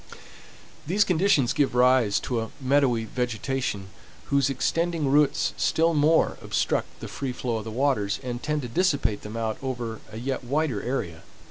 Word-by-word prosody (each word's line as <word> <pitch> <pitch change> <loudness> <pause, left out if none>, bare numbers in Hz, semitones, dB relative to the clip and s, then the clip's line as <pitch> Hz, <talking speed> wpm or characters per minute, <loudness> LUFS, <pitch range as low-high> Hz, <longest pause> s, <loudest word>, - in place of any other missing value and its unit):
These 200 +5 +3
conditions 180 -8 +2
give 140 -4 +1
rise 125 -4 +4
to 120 -4 -2
a 110 - -5
meadowy 130 -4 +2
vegetation, 120 -3 -3 0.4
whose 140 -1 +3
extending 165 +3 0
roots 145 +1 +2
still 165 +1 +2
more 155 +2 +3
obstruct - - -1
the - - -5
free 135 -2 -4
flow 120 -2 -2
of 110 - -6
the - - -5
waters, 110 -4 0
and 120 -1 -4
tend 150 0 -2
to - - -4
dissipate 140 - +1
them 105 +2 -7
out 110 -1 -2
over 120 -4 -4
a 110 - -8
yet 130 +2 -3
wider 135 -4 -1
area. 85 -10 -3
130 Hz, 160 wpm, -26 LUFS, 115-145 Hz, 0.4 s, rise